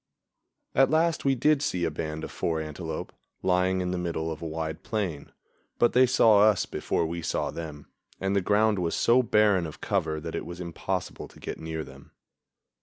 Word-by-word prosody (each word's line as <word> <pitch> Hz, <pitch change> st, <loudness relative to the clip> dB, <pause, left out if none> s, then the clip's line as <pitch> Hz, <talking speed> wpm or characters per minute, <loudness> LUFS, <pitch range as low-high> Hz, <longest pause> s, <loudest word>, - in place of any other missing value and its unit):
At 135 Hz, -, +4 dB
last 160 Hz, +1 st, +2 dB
we 135 Hz, -1 st, +3 dB
did 150 Hz, +3 st, +3 dB
see 90 Hz, -12 st, 0 dB
a -, -, -1 dB
band 80 Hz, +1 st, -4 dB
of -, -, -6 dB
four 80 Hz, -1 st, -1 dB
antelope, 75 Hz, -1 st, -5 dB, 0.3 s
lying 95 Hz, 0 st, +2 dB
in 90 Hz, 0 st, -2 dB
the 90 Hz, -, -2 dB
middle 80 Hz, -2 st, -2 dB
of 80 Hz, -, -7 dB
a 85 Hz, -, -4 dB
wide 80 Hz, 0 st, -4 dB
plain, 95 Hz, -10 st, -3 dB, 0.5 s
but 120 Hz, -, +3 dB
they 130 Hz, +1 st, +6 dB
saw 115 Hz, -5 st, +5 dB
us 105 Hz, -1 st, +4 dB
before 85 Hz, -, -1 dB
we 85 Hz, +1 st, -4 dB
saw 80 Hz, -, -1 dB
them, 75 Hz, -3 st, -7 dB, 0.3 s
and 95 Hz, +1 st, 0 dB
the 100 Hz, -, +3 dB
ground 105 Hz, +1 st, +2 dB
was 85 Hz, -2 st, -1 dB
so 120 Hz, +2 st, +4 dB
barren 105 Hz, -6 st, +3 dB
of 75 Hz, -, -10 dB
cover 80 Hz, -1 st, -1 dB
that 80 Hz, +1 st, -6 dB
it -, -, -3 dB
was 85 Hz, 0 st, -7 dB
impossible 90 Hz, +2 st, -4 dB
to -, -, -18 dB
get -, -, -6 dB
near 80 Hz, -1 st, -4 dB
them. -, -, -14 dB
90 Hz, 195 wpm, -27 LUFS, 80-110 Hz, 0.5 s, they